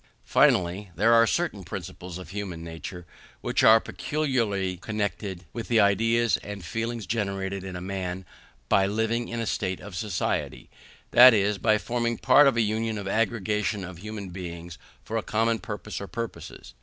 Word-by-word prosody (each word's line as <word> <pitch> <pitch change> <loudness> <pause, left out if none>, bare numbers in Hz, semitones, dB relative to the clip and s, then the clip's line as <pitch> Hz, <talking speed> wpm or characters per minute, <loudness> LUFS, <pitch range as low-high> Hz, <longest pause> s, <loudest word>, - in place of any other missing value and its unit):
Finally, 90 +3 +3
there 110 +7 +4
are 115 0 +6
certain - - -1
principles 90 -1 -7
of 90 -3 -10
human 95 -5 -5
nature 85 +2 -8 0.4
which - - 0
are 110 +1 +8
peculiarly 115 -12 -1
connected 100 -2 -4
with 115 - -5
the 115 -2 +3
ideas 115 +3 +3
and 100 -3 -8
feelings 115 +6 -3
generated 100 -2 -2
in 90 -1 -6
man 95 -1 -4 0.4
by 95 +7 +3
living 110 +3 -1
in 115 - -4
a 115 - -1
state 95 -4 -2
of 100 -1 -9
society, 100 -1 -2 0.4
that 125 -1 +9
is, 100 0 +1
by 110 -1 +3
forming 120 +1 -1
part 130 +6 +6
of 135 - +2
a - - +4
union 110 +1 -1
or 100 -1 -5
aggregation 105 -2 0
of 90 -2 -8
human 105 -1 -6
beings 85 -2 -8 0.2
for 115 - -3
a - - 0
common 115 +1 0
purpose 105 -1 -6
or 100 - -6
purposes. 115 - -7
105 Hz, 165 wpm, -26 LUFS, 95-115 Hz, 0.4 s, that